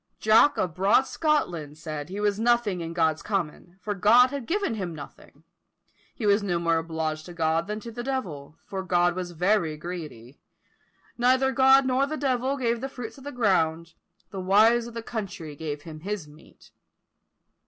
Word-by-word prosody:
"Jock 220 +7 +5
of 180 -3 -1
broad 195 +9 +4
Scotland" 175 - -1
said 155 -1 -6
he 195 +2 -5
was 205 0 0
nothing 230 -6 +2
in 165 0 -5
God's 160 -2 +1
common, 180 -2 -4
for 205 +2 -3
God 230 +6 +5
had 280 -4 -5
given 395 - 0
him 185 -6 -4
nothing; 145 - -13 0.7
he 230 - -4
was 205 +1 +4
no 185 -4 -1
more 165 -1 +1
obliged 160 -1 -3
to 175 - -9
God 165 +1 0
than 210 +1 -3
to 235 - -8
the 240 +2 -6
devil; 175 - -5
for 190 -1 -4
God 175 -1 +2
was 180 0 -4
very 175 -2 +1
greedy. 150 -7 -8 0.8
Neither 260 +2 +3
God 265 0 +5
nor 260 +2 +2
the 310 +2 -4
devil 265 -1 0
gave 235 -2 -1
the 270 - -4
fruits 245 -1 -8
of - - -14
the 285 - -6
ground; 170 - +1 0.4
the 195 - -5
wives 220 +5 +4
of 235 - -11
the 230 - -5
country 190 -10 -6
gave 145 -1 -5
him 155 -2 -9
his 195 -2 -5
meat. 150 +1 -19
195 Hz, 180 wpm, -26 LUFS, 165-240 Hz, 0.8 s, Jock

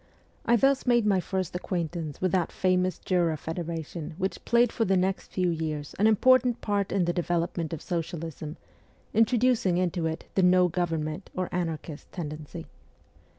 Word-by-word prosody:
I 235 - +6
thus 270 +2 +2
made 240 -3 +4
my 200 -3 +3
first 185 -1 -3
acquaintance 170 -4 -3
with 185 -1 +1
that 180 -2 +1
famous 185 -1 +1
Jura 170 -4 +1
Federation 165 0 -5
which 190 0 -3
played 240 -1 +4
for 225 - 0
the 190 -2 +2
next 190 +1 -1
few 180 -2 +1
years 155 -3 -3
an 210 - +5
important 250 +2 +4
part 205 -2 -1
in 190 -2 +2
the 175 - 0
development 170 -2 -1
of 165 - -5
socialism, 165 -2 -4 0.6
introducing 225 -5 +3
into 175 -2 0
it 160 0 -4
the 190 - +2
no 180 0 +5
government, 165 0 -2
or 185 -1 -2
anarchist, 165 -3 -4
tendency. 155 0 -6
180 Hz, 155 wpm, -27 LUFS, 165-195 Hz, 0.6 s, I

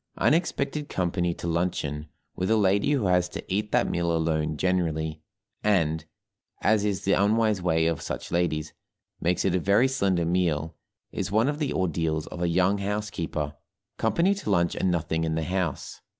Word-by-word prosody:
Unexpected 150 -2 +1
company 85 -1 0
to - - -8
luncheon 80 -3 -1 0.3
with 95 - -2
a 110 - +4
lady 100 +6 +3
who 130 -8 +1
has 90 -1 +2
to - - -7
eat 105 +2 -1
that - - +3
meal 85 -1 0
alone 80 -2 0
generally, 80 -3 -1 0.4
and 80 -6 +1 0.6
(as 105 0 +3
is 100 -2 -1
the 100 - +3
unwise 105 0 +2
way 80 -2 +2
of 80 -2 0
such - - -5
ladies) 85 -3 0 0.5
makes 90 +2 0
it 95 - +2
a 90 - +2
very 100 +8 +4
slender 95 -9 +1
meal, 80 -3 0 0.4
is - - -3
one 110 +4 +3
of 150 +1 -1
the 150 -3 -1
ordeals 80 -3 -1
of 90 - -8
a 85 - +1
young 95 +4 +2
housekeeper; 100 -7 -3 0.4
company 170 - +2
to 200 - -5
lunch 85 -3 +2
and 95 - 0
nothing 80 -1 0
in 80 -1 -1
the 80 - -1
house. 90 -3 -3
90 Hz, 175 wpm, -26 LUFS, 80-100 Hz, 0.6 s, a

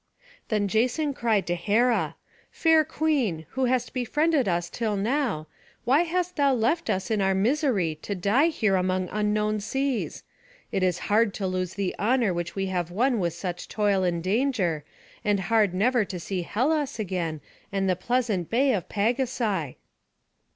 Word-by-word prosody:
Then 210 -3 0
Jason 250 +8 +1
cried 225 -6 +1
to 175 - -1
Hera: 220 +7 +1 0.3
"Fair 320 -1 +4
queen, 285 - 0
who 265 0 0
hast 250 -1 0
befriended 290 +2 +1
us 175 -1 0
till 215 +3 -2
now, 225 - 0 0.4
why 270 +6 +4
hast 355 +1 -1
thou 280 -2 +3
left 250 +9 0
us 190 +3 -1
in 215 -2 +1
our 190 0 +2
misery, 205 - +1
to 200 - -4
die 205 - +3
here 215 - +1
among 185 0 0
unknown 210 0 0
seas? 265 +4 -2 0.5
It 195 - 0
is 185 -1 +2
hard 210 0 +2
to 195 - -3
lose 185 -1 -2
the 195 -2 -1
honour 230 -2 +2
which 175 0 -4
we 195 -1 -1
have 180 -3 -2
won 235 +6 +1
with 170 -3 0
such 175 0 -5
toil 205 -3 +1
and 170 -2 0
danger, 195 - 0 0.4
and 205 -1 +2
hard 210 +1 +2
never 225 +6 +2
to 185 -2 -6
see 185 +2 -3
Hellas 280 - 0
again, 175 -7 -2 0.3
and 195 -1 0
the 185 - +2
pleasant 215 -3 -1
bay 260 +3 +3
of 185 -6 -3
Pagasai." 220 - -1
210 Hz, 165 wpm, -26 LUFS, 185-255 Hz, 0.5 s, Fair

